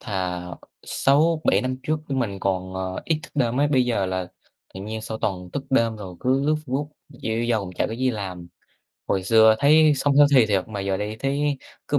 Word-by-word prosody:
thà 90 -3 -3 0.4
6,7 155 +4 +2
năm 130 0 -2
trước 155 +2 -1
mình 115 -8 -1
còn, 95 -1 -2
ờ, 95 0 -4
ít 160 -2 0
thức - - -12
đêm 125 -1 +1
ấy, 145 - +3
bây 130 -3 +3
giờ 115 -6 0
là 95 -1 -3 0.5
tự 95 - -7
nhiên 110 +2 -5
sau 110 0 -5
toàn 90 -3 -3
thức 140 - -4
đêm 115 -4 +2
rồi 95 -4 -8
cứ 130 +2 +1
lướt 155 - +3
Facebook 140 +3 -2 0.2
dễ 115 -4 -3
dầu 100 -6 -1
chả - - +1
có - - -6
gì 130 +2 0
làm. 90 -5 -6 0.6
Hồi 95 -1 0
xưa 110 +1 +5
thấy 155 +2 +5
sống 140 +1 +1
healthy 140 -5 +6
thiệt 100 -1 0
mà 100 -2 -5
giờ 95 -1 -1
đây 105 +2 -4
thấy 140 0 0 0.3
cứ 145 - +2
115 Hz, 205 wpm, -23 LUFS, 95-140 Hz, 0.6 s, healthy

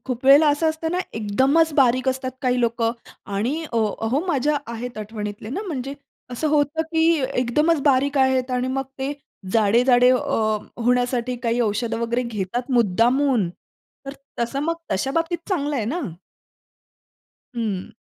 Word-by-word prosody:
खूप 255 -1 -4
वेळेला 290 +3 +7
असं 295 +2 +2
असतं 320 +1 -4
ना 360 - 0 0.2
एकदमच 265 +10 +2
बारीक 255 -1 +3
असतात 260 0 -1
काही 250 -1 +1
लोकं 230 -1 +1 0.4
आणि 260 +11 -1
अ, 235 - -1 0.2
अहो 235 +6 0
माझ्या 295 -2 +1 0.2
आहेत 235 0 -6
आठवणीतले 210 0 -6
ना 385 +11 -3
म्हणजे 275 -5 -4 0.4
असं 275 +6 -2
होतं, 300 +1 +1
की 320 0 +1 0.3
एकदमच 300 +6 +2
बारीक 280 0 +2
आहेत 260 -1 +2
आणि 250 0 -1
मग 270 +1 -1
ते 270 +2 -2 0.4
जाडे-जाडे 245 +3 +4
अ, 220 -4 +1 0.3
होण्यासाठी 245 0 +1
काही 235 +1 0
औषधं 225 +1 -1
वगैरे 235 +1 0
घेतात, 235 +2 -4
मुद्दामून 240 0 +2 0.6
तर 275 - -5 0.3
तसं 240 +4 -1
मग 335 +2 0 0.2
तशा 230 +8 -1
बाबतीत 330 +3 -1
चांगलं 295 -6 -1
आहे 220 - -1
ना. 310 +11 -2 1.5
हं. 210 -6 -3
255 Hz, 145 wpm, -22 LUFS, 230-285 Hz, 1.5 s, वेळेला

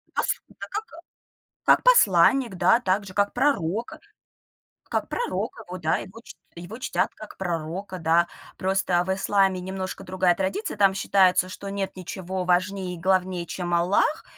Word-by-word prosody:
Пос - - 0 0.2
у - - -20
да, - - -8
как 425 +2 -3 0.8
как - - +5
посланник, 235 - +5
да, 230 +6 +4
также, 190 -2 -1
как 205 0 +1
пророка 235 - 0 0.9
как - - -2
пророка 485 0 -3
его, 180 +1 -6
да, 155 - +1
его 225 +4 -10
чт - - -12 0.2
его 175 +7 -8
чтят, - - -1
как 215 - -11
пророка, 180 +2 -4
да. 165 +1 +3 0.3
Просто 185 -2 +1
в 190 - -1
исламе 195 -1 +1
немножко 190 +1 -5
другая 185 -1 +1
традиция. 195 +4 -3
Там 195 -1 +4
считается, 185 -1 +3
что 200 +1 -8
нет 195 -1 -3
ничего 185 0 -5
важнее 185 +1 0
и - - -9
главнее 185 -1 0
чем 175 0 -3
Аллах, 185 - +2
190 Hz, 155 wpm, -25 LUFS, 180-200 Hz, 0.9 s, как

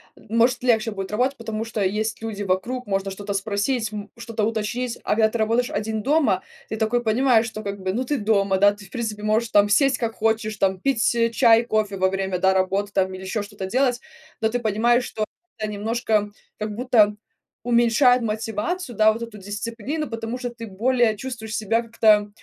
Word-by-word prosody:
может 235 +2 +1
легче 230 -3 +2
будет 195 -2 -5
работать, 250 +6 +1
потому 225 -1 -4
что 225 -2 -4
есть 215 +4 -1
люди 215 -2 -4
вокруг, 230 +7 -1
можно 195 -1 -1
что-то 200 +1 -5
спросить, 215 +3 -1
м 210 -1 -7
что-то 230 -2 -4
уточнить. 230 +3 -2
А - - -2
когда 220 0 +4
ты 235 - -4
работаешь 230 +3 +1
один 215 +1 -2
дома, 275 -10 +2 0.3
ты - - -3
такой 225 +2 +1
понимаешь, 230 0 +3
что 215 -1 -7
как 200 -1 -5
бы, 185 0 -2
ну, 245 +5 -1
ты 280 +2 -1
дома, 200 -2 +2
да, 205 +1 +6
ты, 205 0 -13
в 195 - -18
принципе, 220 -4 -4
можешь 220 +2 +1
там 205 -1 +4
сесть 270 +6 +3
как 230 -2 -2
хочешь, 220 -1 -1
там 190 -1 +1
пить 235 0 +1 0.2
чай, 230 -2 +5
кофе 215 -3 0
во 190 0 +2
время, 190 -1 -1
да, 190 +1 +3
работы 195 +2 0
там 190 -1 +1
или 185 0 -8
ещё 190 +3 -2
что-то 200 -1 -7
делать. 250 +4 +1 0.4
Но 220 - +1
ты 245 +2 -1
понимаешь, 235 +2 +2
что 215 -3 -3 0.3
это 215 - -3
немножко 215 0 0 0.3
как 210 -1 -4
будто 220 -4 +3 0.5
уменьшает 245 +1 +4
мотивацию, 225 - -3
да, 215 0 +5
вот 230 - -7
эту 230 -2 -7
дисциплину. 230 +9 -4
Потому 230 +1 -4
что 250 -1 -4
ты 230 -1 -9
более 230 +3 +1
чувствуешь 220 -1 -6
себя 225 +2 +1
как-то, 215 -2 +3
220 Hz, 195 wpm, -23 LUFS, 205-235 Hz, 0.5 s, да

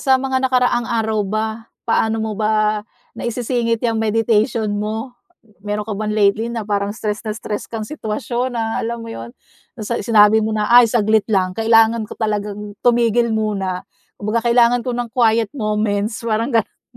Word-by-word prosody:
sa 265 -2 +4
mga 265 0 -1
nakaraang 245 -2 +1
araw 220 -2 0
ba, 215 +2 -1 0.4
paano 225 0 +1
mo 220 0 -2
ba 215 0 +1 0.3
naisisingit 235 -1 -1
yang 225 -2 +1
meditation 220 +1 +1
mo? 220 +4 -3 0.5
Meron 210 +1 -3
ka 215 - -5
bang 215 +1 -3
lately 210 +2 +2
na 230 -2 -4
parang 200 -1 -1
stress 210 -3 -3
na 220 - -5
stress 210 -2 -5
kang 225 -2 -4
sitwasyon 240 0 -3
na 225 -1 -1
alam 230 0 -4
mo 225 - -7
'yon - - -7 0.5
sa 235 +3 -2
sinabi 215 -2 +5
mo 220 0 -1
na 210 0 -1
ay 240 0 +8
saglit 220 -2 +2
lang 190 -4 +1
kailangan 225 +1 +3
ko - - -9
talagang 210 -1 -3
tumigil 235 -1 +2
muna 195 -4 -2 0.3
kumbaga 225 +3 -2
kailangan 240 +1 +3
ko 250 - -1
ng 240 -1 -3
quiet 225 -2 +2
moments 215 -2 -1
parang 230 +1 0
ganun. 225 - -1
220 Hz, 165 wpm, -19 LUFS, 210-235 Hz, 0.5 s, ay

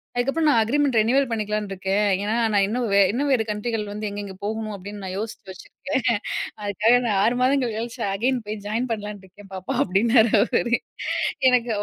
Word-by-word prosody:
அதுக்கப்பறம் 275 +6 +1
நான் 230 -5 +4
அக்ரீமெண்ட் 275 +3 +1
ரினுயூவல் 265 +5 +3
பண்ணிக்கலாம்னு 210 -2 -2
இருக்கேன், 195 +2 0 0.2
ஏன்னா 215 +2 -1 0.2
நான் 200 -1 +4
இன்னும் 235 +2 -1
வே - - +5
இன்னும் 280 +5 -1
வேற 235 -4 +3
கண்ட்ரிகள் 210 +1 -2
வந்து 210 +1 -5
எங்கெங்க 200 -1 -6
போகணும் 215 0 -3
அப்படீன்னு 200 +1 -8
நான் 185 -1 -5
யோசிச்சு 215 -2 -6
வச்சிருக்கேன். 245 +3 -2 0.4
அதுக்காக 210 +4 +3
நான் 210 -4 +1
6 240 +3 +2
மாதங்கள் 255 -2 +2
கழிச்சு 235 +2 -5
அகைன் 250 +5 0
போய் 210 - -4
ஜாயின் 230 +4 -2
பண்ணலாம்னு 210 -2 -5
இருக்கேன் 195 +1 -16
பாப்பா." 185 -1 -4
அப்படின்னாரு 220 +4 +3
அவர். 235 +1 0 0.8
எனக்கு 245 -1 +2
220 Hz, 175 wpm, -23 LUFS, 205-245 Hz, 0.8 s, வே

